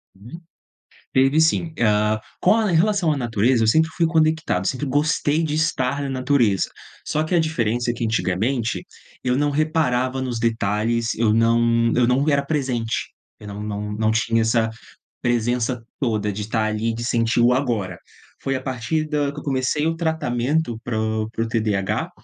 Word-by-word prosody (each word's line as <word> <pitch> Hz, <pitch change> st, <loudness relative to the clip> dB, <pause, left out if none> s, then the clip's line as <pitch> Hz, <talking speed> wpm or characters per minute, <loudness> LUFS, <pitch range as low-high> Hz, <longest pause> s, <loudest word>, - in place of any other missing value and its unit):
Hum, 120 Hz, -, -11 dB, 0.7 s
teve 135 Hz, +4 st, +4 dB
sim. 160 Hz, 0 st, +2 dB, 0.7 s
Com 185 Hz, -, +4 dB
relação 185 Hz, -1 st, +2 dB
à 145 Hz, -, -1 dB
natureza, 115 Hz, 0 st, +1 dB
eu -, -, +2 dB
sempre 160 Hz, +7 st, +3 dB
fui 170 Hz, -, +2 dB
conectado, 160 Hz, -, +1 dB
sempre 135 Hz, +3 st, -2 dB
gostei 150 Hz, +2 st, +1 dB
de 150 Hz, -2 st, -2 dB
estar 145 Hz, -4 st, 0 dB
na 140 Hz, -, -3 dB
natureza. 130 Hz, -6 st, +1 dB, 0.4 s
Só 155 Hz, -, 0 dB
que 165 Hz, +3 st, -1 dB
a -, -, +4 dB
diferença 120 Hz, -7 st, 0 dB
é -, -, -5 dB
que, 120 Hz, -, -5 dB
antigamente, 110 Hz, +4 st, -1 dB, 0.4 s
eu 125 Hz, 0 st, +1 dB
não 145 Hz, +1 st, +2 dB
reparava 140 Hz, -4 st, 0 dB
nos 125 Hz, -3 st, -3 dB
detalhes, 115 Hz, +1 st, 0 dB
eu 110 Hz, -1 st, +2 dB
não 115 Hz, +1 st, +3 dB
eu 120 Hz, -1 st, +3 dB
não 135 Hz, +4 st, +2 dB
era 140 Hz, -1 st, +2 dB
presente, 130 Hz, -6 st, -2 dB, 0.3 s
eu 105 Hz, -, -11 dB
não 100 Hz, 0 st, -7 dB
não 105 Hz, 0 st, -4 dB
não 110 Hz, +1 st, 0 dB
tinha 115 Hz, 0 st, +1 dB
essa 110 Hz, 0 st, +2 dB, 0.5 s
presença 120 Hz, 0 st, 0 dB, 0.2 s
toda 110 Hz, -6 st, 0 dB
de 105 Hz, -, -5 dB
estar 110 Hz, +1 st, -1 dB
ali, 110 Hz, +1 st, -1 dB
de 115 Hz, +1 st, -5 dB
sentir 115 Hz, -1 st, +1 dB
o 120 Hz, +1 st, +5 dB
agora. 115 Hz, -9 st, -1 dB, 0.4 s
Foi 135 Hz, -, -1 dB
a 130 Hz, -, -3 dB
partir 130 Hz, +5 st, -2 dB
de 150 Hz, -2 st, -1 dB
que 150 Hz, -, -8 dB
eu -, -, -11 dB
comecei 135 Hz, +2 st, 0 dB
o 165 Hz, -, 0 dB
tratamento 150 Hz, -5 st, -1 dB
para 120 Hz, -3 st, -2 dB
o 110 Hz, 0 st, -1 dB
para 115 Hz, -, -2 dB
o -, -, -3 dB
TDAH, 105 Hz, -4 st, -1 dB
120 Hz, 175 wpm, -22 LUFS, 115-145 Hz, 0.7 s, o